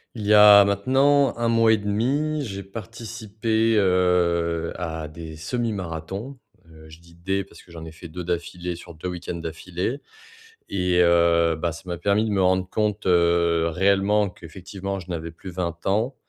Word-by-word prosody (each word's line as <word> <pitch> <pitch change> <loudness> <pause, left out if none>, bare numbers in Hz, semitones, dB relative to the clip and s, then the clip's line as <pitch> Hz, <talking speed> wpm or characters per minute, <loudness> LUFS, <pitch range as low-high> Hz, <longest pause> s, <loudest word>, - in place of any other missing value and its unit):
Il 105 -3 -5
y 105 - +6
a 105 -1 +9
maintenant 135 +8 +2
1 120 - +1
mois 115 -1 +4
et - - +3
1/2 135 +9 -1
j'ai 100 -3 -6
participé, 110 +1 -2
heu, 85 -3 +1
à 80 -3 -5
des 80 0 -9
semi-marathons, 95 - -4 0.3
heu, 80 -1 -15
je 80 +1 -14
dis: 85 0 -19
«des» 95 +3 -2
parce - - -17
que 85 - -19
j'en 80 -1 -9
ai 80 - -9
fait 80 +2 -12
2 90 +3 -7
d'affilée 85 0 -4
sur 85 - -12
2 80 +3 -7
week-ends 90 0 -6
d'affilée 90 - -4 0.7
et 90 -2 +1
heu, 85 -1 +3
bah, 85 +2 -2
ça 85 - -9
m'a 85 -1 -4
permis 100 +5 +1
de 110 - -2
me 100 -2 0
rendre 95 0 +1
compte, 105 -1 -1
heu, 85 -1 +3
réellement 100 +4 +2
qu'effectivement 95 +3 -7
je 90 0 -12
n'avais 85 -1 -5
plus 85 +3 -11
20 85 -2 -4
ans 110 +7 0
90 Hz, 175 wpm, -23 LUFS, 85-105 Hz, 0.7 s, a